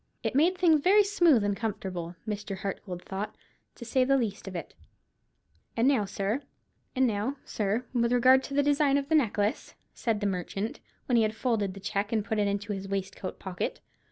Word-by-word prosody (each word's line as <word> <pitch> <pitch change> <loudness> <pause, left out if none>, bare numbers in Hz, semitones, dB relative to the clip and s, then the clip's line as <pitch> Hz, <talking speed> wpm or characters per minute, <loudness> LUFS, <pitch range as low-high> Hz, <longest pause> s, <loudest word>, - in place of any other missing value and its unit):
It - - -1
made 335 +7 +3
things 325 -5 +4
very 405 +6 +6
smooth 345 - +4
and 205 -1 +1
comfortable, 185 -5 -4
Mr. 210 -2 -4
Hartgold 190 -2 -5
thought, 195 +2 -5 0.4
to 235 - -9
say 255 +3 +2
the 275 +1 +3
least 220 -6 -3
of 190 - -6
it. 170 - -6 1.0
"And 230 +3 +3
now, 260 -7 +3
sir, 200 +6 -2 1.5
with 235 -1 +2
regard 255 +2 +6
to 275 - -6
the 285 - +4
design 285 -1 +3
of 280 0 -3
the - - +1
necklace," 215 -7 +1 0.2
said 225 -4 -1
the 205 - -2
merchant, 195 +3 -3 0.3
when 245 - +2
he - - +5
had 215 0 0
folded 215 -6 0
the - - -8
cheque 200 +1 -2
and 215 -3 0
put 220 -2 -1
it 205 - +2
into 205 +1 -2
his 195 0 -5
waistcoat 195 -1 -4
pocket. 185 -2 -4
215 Hz, 185 wpm, -28 LUFS, 195-270 Hz, 1.5 s, very